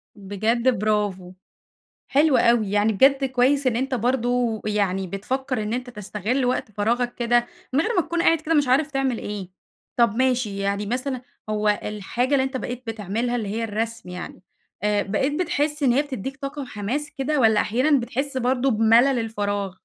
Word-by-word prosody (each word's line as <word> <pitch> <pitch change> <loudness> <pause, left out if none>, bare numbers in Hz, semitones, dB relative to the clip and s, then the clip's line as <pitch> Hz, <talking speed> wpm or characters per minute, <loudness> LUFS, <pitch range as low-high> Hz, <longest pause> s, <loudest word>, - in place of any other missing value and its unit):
بجد 220 +4 0
برافو، 205 -4 -1 0.8
حلو 290 0 +4
أوي، 230 -4 +3
يعني 210 +2 +2
بجد 270 +6 +4
كويس 260 +2 +2
إن 235 -2 +2
أنت 265 +2 -1
برضه 245 -1 0
يعني 195 -3 0
بتفكّر 250 +5 -3
إن 210 - -3
أنت 245 +1 -3
تستغِل 210 +4 -2
وقت 245 -3 -1
فراغك 235 +4 0
كده، 240 0 +2 0.3
من 270 - +3
غير 430 +8 0
ما 355 - +4
تكون 340 +1 -2
قاعد 330 -2 +4
كده 325 +1 -1
مش 290 -4 +3
عارف 280 +4 +3
تعمل 270 -4 0
إيه. 200 -3 -6 0.5
طَب 235 -4 +3
ماشي، 250 -6 +1
يعني 200 +1 -1
مثلًا 255 +3 -2 0.3
هو 210 0 0
الحاجة 225 +6 -2
اللي 265 - +3
أنت 265 0 -3
بقيت 250 0 -5
بتعملها 225 +2 -2
اللي 220 -4 -3
هي 225 +3 -2
الرسم 225 -1 -3
يعني، 180 +1 -8 0.4
آآ، 210 -1 +2
بقيت 220 +8 -1
بتحس 295 -2 -1
إن 250 -3 +4
هي 280 +4 +3
بتدّيك 270 -2 -6
طاقة 280 +1 -5
وحماس 255 +6 -4
كده 280 +1 0
والّا 220 -2 +4
أحيانًا 260 +5 +2
بتحس 265 +4 -3
برضه 260 +1 +1
بملل 230 +4 +4
الفراغ؟ 205 -3 -2
240 Hz, 170 wpm, -23 LUFS, 210-265 Hz, 0.8 s, حلو